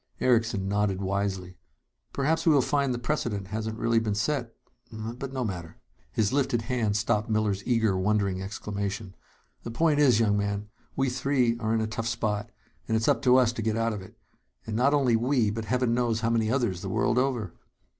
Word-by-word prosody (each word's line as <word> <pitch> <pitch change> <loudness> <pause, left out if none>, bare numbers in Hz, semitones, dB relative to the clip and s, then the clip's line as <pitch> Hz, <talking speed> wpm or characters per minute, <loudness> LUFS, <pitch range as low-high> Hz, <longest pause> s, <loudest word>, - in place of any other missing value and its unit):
Erickson 115 -5 +2
nodded 100 -1 0
wisely. 95 -2 -2 0.5
"Perhaps 155 +5 0
we - - +7
will 140 -4 +4
find 140 -1 +1
the 120 - -1
precedent 120 -7 -2
hasn't 110 +1 -3
really 115 0 +2
been 110 -2 -1
set! 120 +1 -1 0.4
But 115 +4 -6
no 130 -2 -2
matter 85 -5 -6 0.2
" - - -37
His 110 - 0
lifted 130 -4 +1
hand 110 -4 0
stopped 105 0 0
Miller's 105 -3 +1
eager, 115 -5 +2
wondering 100 -1 0
exclamation. 100 0 -4 0.5
"The - - -6
point 150 +5 +2
is, 130 -6 +5
young 105 -3 +3
man, 100 0 -2 0.3
we 135 -1 +1
three 130 -2 +1
are 110 -1 -1
in 115 0 +2
a - - 0
tough 110 +1 -4
spot, 110 -2 -2 0.4
and 110 - +2
it's 110 - -1
up - - +3
to 130 -2 +5
us 125 -2 +3
to 115 - -4
get 110 0 0
out 115 0 +1
of 105 - -5
it. 95 - -14 0.5
And 110 - -4
not 135 +5 +3
only 130 -5 +3
we, 120 -2 +2
but 110 +1 -4
heaven 125 +2 +1
knows 120 -2 0
how 115 0 +1
many 110 -2 +1
others 115 -8 0
the - - -5
world 125 - +1
over!" 125 -8 -1
115 Hz, 200 wpm, -27 LUFS, 105-125 Hz, 0.5 s, we